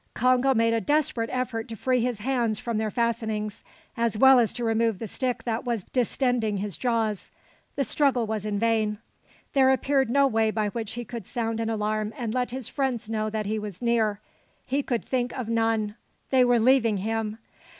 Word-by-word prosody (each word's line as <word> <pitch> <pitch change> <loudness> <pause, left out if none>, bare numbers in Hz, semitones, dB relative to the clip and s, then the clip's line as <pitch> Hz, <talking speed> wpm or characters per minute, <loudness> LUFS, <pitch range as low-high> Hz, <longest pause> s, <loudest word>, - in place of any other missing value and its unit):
Congo 255 +2 +3
made 230 0 +3
a 230 - +1
desperate 295 -5 0
effort 250 -3 -2
to 225 - -6
free 255 +4 +1
his 240 -3 -2
hands 235 -3 0
from 230 -1 -2
their 220 -1 -1
fastenings, 220 -2 -2 0.3
as 230 -2 0
well 265 +2 +7
as 230 -3 +2
to 240 - -5
remove 225 -2 +1
the 225 - -5
stick 250 +4 -2
that 230 -1 -2
was 235 -5 -2
distending 245 -3 0
his 200 -2 -3
jaws. 225 -5 -1 0.5
The 280 - +1
struggle 265 -4 +1
was 215 -2 -3
in 210 -1 -2
vain. 220 -1 +1 0.6
There 265 -1 +5
appeared 265 0 +2
no 280 +3 +4
way 225 -4 +2
by 215 -1 0
which 220 0 -5
he 240 0 -5
could 230 -4 -7
sound 225 -1 -2
an 225 0 -1
alarm 215 0 -1
and 230 -3 -3
let 250 -1 0
his 255 -1 -5
friends 245 -5 -2
know 215 -1 -1
that 215 0 -3
he 215 +2 -1
was 205 -3 -7
near. 225 -4 +1 0.5
He 275 +3 0
could 240 -4 -2
think 250 -1 -1
of 245 -3 -4
none. 225 -2 +1 0.4
They 260 -1 +5
were 245 -1 +4
leaving 230 -2 +4
him. 220 +2 -2
230 Hz, 195 wpm, -26 LUFS, 215-250 Hz, 0.6 s, well